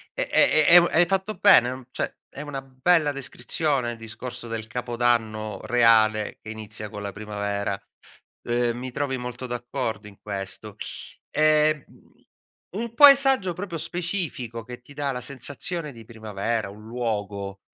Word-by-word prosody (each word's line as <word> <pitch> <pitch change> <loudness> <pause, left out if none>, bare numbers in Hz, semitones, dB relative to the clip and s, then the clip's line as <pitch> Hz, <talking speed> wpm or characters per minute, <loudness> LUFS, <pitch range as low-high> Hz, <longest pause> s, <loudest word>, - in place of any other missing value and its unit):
e - - -1
e 155 -1 +5
e 170 - +7
e - - +12
un 170 - +3
e - - -10
hai 175 - +7
fatto 195 +3 -1
bene 185 - +6
uhm 130 -1 -7
cioè, - - -2 0.2
è 140 - -9
una 145 -2 -5
bella 145 +4 +2
descrizione 140 -1 -2
il 115 - -8
discorso 120 +2 -7
del 115 -1 -4
Capodanno 115 -3 -1
reale 110 -3 +4
che 110 - -10
inizia 110 -1 -7
con 105 0 -7
la 100 - -4
primavera. 100 -1 -3 0.7
Ehm, 120 0 +1
mi 130 0 -6
trovi 135 0 -2
molto 125 +1 -6
d'accordo 115 -3 -4
in 100 -1 -15
questo. 100 -2 -6 0.6
Ehm, 155 -1 +3
mhmm, - - -22 0.6
un 230 +2 -4
paesaggio 270 -9 +7
proprio 180 -2 -5
specifico 165 - -3
che 125 +1 -9
ti 145 +3 -15
dà 140 -1 -2
la 125 -1 -4
sensazione 145 +5 -3
di 115 -3 -13
primavera, 110 -1 -3
un 105 +1 -13
luogo, 100 -4 -3
125 Hz, 160 wpm, -25 LUFS, 110-150 Hz, 0.7 s, e